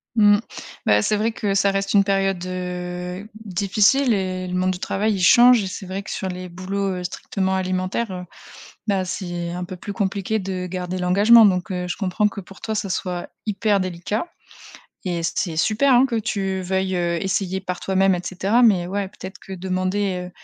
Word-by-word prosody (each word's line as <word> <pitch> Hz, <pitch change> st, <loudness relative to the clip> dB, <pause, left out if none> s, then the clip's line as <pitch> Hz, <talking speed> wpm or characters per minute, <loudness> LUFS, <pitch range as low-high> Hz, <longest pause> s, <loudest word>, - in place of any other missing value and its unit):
Mmh. 205 Hz, -2 st, +6 dB, 0.5 s
Bah 105 Hz, 0 st, +5 dB
c'est 210 Hz, -, +1 dB
vrai 220 Hz, +2 st, +1 dB
que 205 Hz, -3 st, -2 dB
ça 200 Hz, 0 st, +3 dB
reste 195 Hz, 0 st, -1 dB
une 200 Hz, -1 st, +6 dB
période, 195 Hz, -2 st, 0 dB
heu, 180 Hz, +1 st, -5 dB, 0.2 s
difficile 210 Hz, +7 st, +3 dB
et 185 Hz, -2 st, -2 dB
le 180 Hz, -, -3 dB
monde 185 Hz, +1 st, +1 dB
du 180 Hz, -, -5 dB
travail 210 Hz, +3 st, 0 dB
il 195 Hz, -, -2 dB
change 240 Hz, +5 st, +7 dB
et -, -, -3 dB
c'est 190 Hz, +1 st, -6 dB
vrai 190 Hz, +2 st, -4 dB
que 200 Hz, -, -11 dB
sur 190 Hz, -, -3 dB
les 180 Hz, 0 st, -6 dB
boulots, 190 Hz, +2 st, -3 dB
heu, 180 Hz, -, -5 dB
strictement 190 Hz, +1 st, -2 dB
alimentaires, 185 Hz, +3 st, -1 dB
heu, 180 Hz, -1 st, -5 dB, 0.6 s
bah 195 Hz, -2 st, +1 dB
c'est 175 Hz, -2 st, -4 dB
un 180 Hz, +1 st, -4 dB
peu 180 Hz, +1 st, -7 dB
plus 190 Hz, +3 st, -7 dB
compliqué 200 Hz, +2 st, -1 dB
de 185 Hz, -2 st, -4 dB
garder 180 Hz, 0 st, -4 dB
l'engagement 205 Hz, +6 st, +6 dB
donc 185 Hz, +1 st, 0 dB
heu, 180 Hz, -1 st, -3 dB
je -, -, -4 dB
comprends 200 Hz, +1 st, +1 dB
que 200 Hz, -1 st, -6 dB
pour 195 Hz, +1 st, -15 dB
toi 220 Hz, -, -3 dB
ça 200 Hz, -2 st, -2 dB
soit 180 Hz, -1 st, -3 dB, 0.2 s
hyper 210 Hz, 0 st, +1 dB
délicat, 185 Hz, -, -3 dB, 0.8 s
et 175 Hz, -2 st, -1 dB
c'est 165 Hz, 0 st, -2 dB
super 225 Hz, +10 st, +3 dB
hein 250 Hz, +2 st, +6 dB
que 240 Hz, -3 st, -2 dB
tu 195 Hz, -3 st, -2 dB
veuilles, 190 Hz, 0 st, -1 dB
heu, 170 Hz, -1 st, 0 dB
essayer 190 Hz, -1 st, -1 dB
par 180 Hz, -1 st, -4 dB
toi-même 190 Hz, 0 st, +2 dB
et 175 Hz, -, -2 dB
cetera 200 Hz, +6 st, +1 dB
mais 190 Hz, -7 st, +4 dB
ouais 200 Hz, +1 st, -2 dB
peut-être 190 Hz, +1 st, -10 dB
que 195 Hz, -, -10 dB
demander, 185 Hz, 0 st, -2 dB
190 Hz, 195 wpm, -22 LUFS, 180-200 Hz, 0.8 s, change